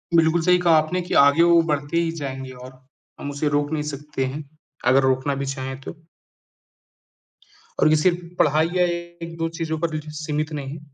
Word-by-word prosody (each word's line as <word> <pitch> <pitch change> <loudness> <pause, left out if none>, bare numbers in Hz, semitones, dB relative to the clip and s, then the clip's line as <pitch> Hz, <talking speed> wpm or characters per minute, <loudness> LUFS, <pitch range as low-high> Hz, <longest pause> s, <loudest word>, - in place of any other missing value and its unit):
बिल्कुल 165 +1 +4
सही 180 +1 +4
कहा 170 -2 +4
आपने 155 +4 0
कि 175 - -5
आगे 145 +4 +5
वो 170 -1 +6
बढ़ते 145 +3 -1
ही 170 -1 +1
जाएँगे 135 -1 -5
और 125 +1 -11 0.5
हम 145 - -5
उसे 145 +1 -1
रोक 145 +1 0
नहीं 150 -1 -1
सकते 145 -1 -4
हैं, 145 +4 -5 0.4
अगर 135 +1 +5
रोकना 130 +2 +1
भी 140 0 -3
चाहें 135 0 -5
तो। 170 - -8 1.8
और - - +5
ये 155 - +5
सिर्फ़ 175 +3 +2 0.2
पढ़ाई 155 +2 +3
या 180 - +4
1-2 170 -1 -4
चीज़ों 160 -1 -2
पर 165 -1 -2
ही 155 - -2
सीमित 150 0 -3
नहीं 140 -2 -5
है, 155 - -8
155 Hz, 185 wpm, -23 LUFS, 140-165 Hz, 1.8 s, वो